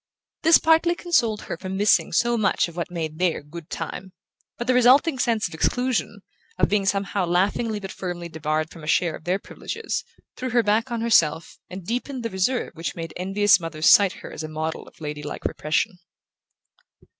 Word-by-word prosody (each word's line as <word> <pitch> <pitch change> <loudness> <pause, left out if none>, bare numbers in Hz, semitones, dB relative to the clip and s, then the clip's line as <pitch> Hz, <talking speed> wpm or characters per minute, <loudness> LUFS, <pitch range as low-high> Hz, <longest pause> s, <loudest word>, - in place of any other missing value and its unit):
This 325 +1 +7
partly 325 +2 +3
consoled 235 -13 +1
her - - -5
for 185 +2 -7
missing 200 +2 +2
so 240 0 +2
much 215 -5 +2
of 170 - -12
what 170 - -3
made 160 -2 -5
their 180 -4 0
"good 160 +2 -10
time"; 185 0 -6 0.4
but 240 - -4
the 255 - +2
resulting 255 +4 +5
sense 230 -4 +1
of 175 - -12
exclusion, 250 +9 -1 0.4
of - - +3
being 200 -1 +1
somehow 195 -1 0
laughingly 205 +5 +1
but 195 -1 -7
firmly 175 -2 -5
debarred 155 0 -2
from 165 - -12
a - - -8
share 170 0 +2
of - - -13
their 180 +2 +1
privileges, 455 - -5 0.3
threw 255 - -4
her 240 -1 +3
back 220 +4 +1
on 235 -1 -3
herself 170 -9 +2
and 185 -1 -8
deepened 250 +3 -3
the 230 - -3
reserve 190 +7 0
which 165 0 -5
made 165 -1 -6
envious 195 +3 +3
mothers 165 -2 -4
cite 200 -2 +5
her - - -8
as - - -6
a 155 - -5
model 155 +1 -4
of - - -18
ladylike 150 -1 -6
repression. 160 +4 -1
190 Hz, 190 wpm, -24 LUFS, 165-235 Hz, 0.4 s, This